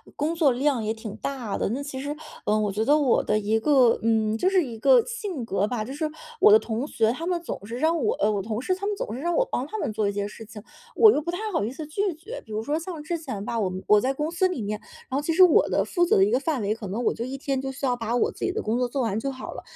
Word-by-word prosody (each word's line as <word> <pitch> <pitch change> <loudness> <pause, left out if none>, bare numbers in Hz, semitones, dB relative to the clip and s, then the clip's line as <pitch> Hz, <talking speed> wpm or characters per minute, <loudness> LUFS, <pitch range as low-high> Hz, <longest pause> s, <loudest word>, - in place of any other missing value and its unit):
工 305 +3 -1
作 310 -6 +3
量 265 -1 +1
也 215 +1 -1
挺 220 -1 -8
大 250 -7 -4
的。 - - 0
那 255 +7 -2
其 275 -2 -6
实， 290 +2 -4 0.3
嗯， 215 0 +2
我 205 - 0
觉 215 +3 -1
得 295 +4 +5
我 280 -5 +3
的 - - +1
一 215 +1 +1
个 255 -2 +4
嗯， 220 -1 +2
就 370 - +2
是 380 -2 +3
一 235 -5 -7
个 - - +5
性 415 - -4
格 205 -2 0
吧， 230 -1 -2
就 235 - -7
是 310 +2 -2 0.3
我 425 - +7
的 425 - +9
同 240 - -3
学 225 -5 +1
他 325 +7 -5
们 355 -2 0
总 200 - -6
是 230 +3 -6
让 320 +3 +1
我 220 - +2
呃， 210 - +1
我 205 -2 -1
同 215 +3 -3
事 370 - 0
他 385 +2 -4
们 415 - -1
总 215 - -4
是 245 - -5
让 345 +3 -1
我 - - +3
帮 255 - -1
他 435 - -5
们 230 - -2
做 215 -1 0
一 200 - -1
些 205 0 -2
事 225 - -11
情， 210 -1 -11 0.3
我 440 - +8
又 300 - +1
不 325 - -6
太 350 +2 -2
好 325 - 0
意 225 - -3
思 305 +2 -7
拒 390 +4 -1
绝。 400 +11 -8
比 220 - -9
如 215 +1 -2
说 295 +6 -1
像 330 -2 -7
之 335 +3 -2
前 220 -11 -6
吧， 230 +2 -2
我 195 -4 0
们 185 +1 -6
我 210 - +6
在 260 +5 0
公 300 +3 -2
司 360 +2 +2
里 360 -10 -4
面， 210 0 -3 0.3
然 265 - -1
后 - - 0
其 325 +3 -1
实 370 +3 +7
我 355 -4 +5
的 - - +1
负 350 -2 +1
责 - - +3
的 195 - +5
一 205 - +2
个 250 - +3
范 280 -2 -1
围， 205 +1 0
可 220 -2 -7
能 210 +6 -3
我 - - +2
就 230 - -4
一 265 +2 -5
天 275 -1 -2
就 270 0 -4
需 270 +1 -4
要 250 -2 +1
把 230 0 -2
我 245 - +2
自 - - -4
己 375 - -1
的 - - -2
工 220 +2 -1
作 250 - +1
做 265 +3 -2
完 220 -3 0
就 275 +4 -2
好 260 -1 -7
了， - - -8
260 Hz, 345 characters per minute, -25 LUFS, 220-320 Hz, 0.3 s, 的